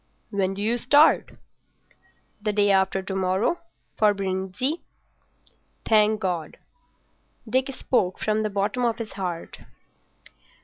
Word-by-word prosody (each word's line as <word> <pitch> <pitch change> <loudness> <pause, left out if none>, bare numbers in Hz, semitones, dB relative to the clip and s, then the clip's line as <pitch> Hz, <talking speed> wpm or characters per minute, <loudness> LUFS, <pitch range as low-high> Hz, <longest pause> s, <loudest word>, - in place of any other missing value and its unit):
"When 195 -2 0
do 200 - -4
you 235 +3 +1
start?" 290 +6 +4 1.1
"The 210 0 0
day 205 -1 +3
after 190 0 +2
to 190 0 -4
morrow—for 205 - 0
Brindisi." 195 - -2 1.0
"Thank 215 -1 +4
God." 175 -6 -3 0.9
Dick 260 +4 +1
spoke 190 -8 0
from 215 0 0
the 215 - -1
bottom 205 +5 -1
of 235 -2 +1
his 225 -3 -6
heart. 180 -4 -5
205 Hz, 115 wpm, -25 LUFS, 190-230 Hz, 1.1 s, start